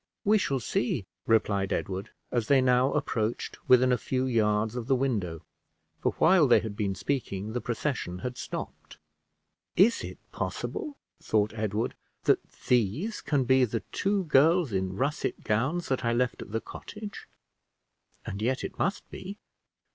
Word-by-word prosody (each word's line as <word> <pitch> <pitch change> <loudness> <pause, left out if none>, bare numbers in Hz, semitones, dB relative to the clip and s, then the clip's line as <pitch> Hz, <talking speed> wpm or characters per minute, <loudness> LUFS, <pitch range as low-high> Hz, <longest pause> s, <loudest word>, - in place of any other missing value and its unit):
"We 215 +1 +5
shall 140 -8 0
see," 115 -2 -1 0.2
replied 100 -3 +2
Edward, 95 0 -2 0.2
as 120 -3 0
they 140 -1 +5
now 130 +1 +4
approached 115 -6 -1
within 125 0 +6
a 125 - +2
few 130 0 -1
yards 110 -2 +1
of 120 -2 -4
the 135 - +4
window; 100 - -1 0.6
for - - 0
while 165 -2 +5
they 120 - +6
had 110 -2 -5
been 100 -3 -1
speaking 110 -5 -2
the 125 - -1
procession 120 -7 -2
had 125 0 -3
stopped. - - -7 0.8
"Is 220 +6 +4
it - - -7
possible," 295 -3 -4 0.2
thought 105 0 +1
Edward, 110 0 -1 0.3
"that - - +4 0.3
these 125 - +1
can 145 -3 +1
be 130 +1 +4
the 115 -2 0
two 200 0 +1
girls 160 0 +4
in 95 -1 -1
russet 145 +5 -1
gowns, 130 +11 0
that 130 - 0
I 115 0 +2
left 125 +1 0
at - - -9
the 110 +1 -1
cottage? 210 -1 -9 1.0
And 100 - -5
yet 130 +4 0
it - - -6
must 195 - -1
be. 195 +2 -7
125 Hz, 155 wpm, -28 LUFS, 110-145 Hz, 1.0 s, within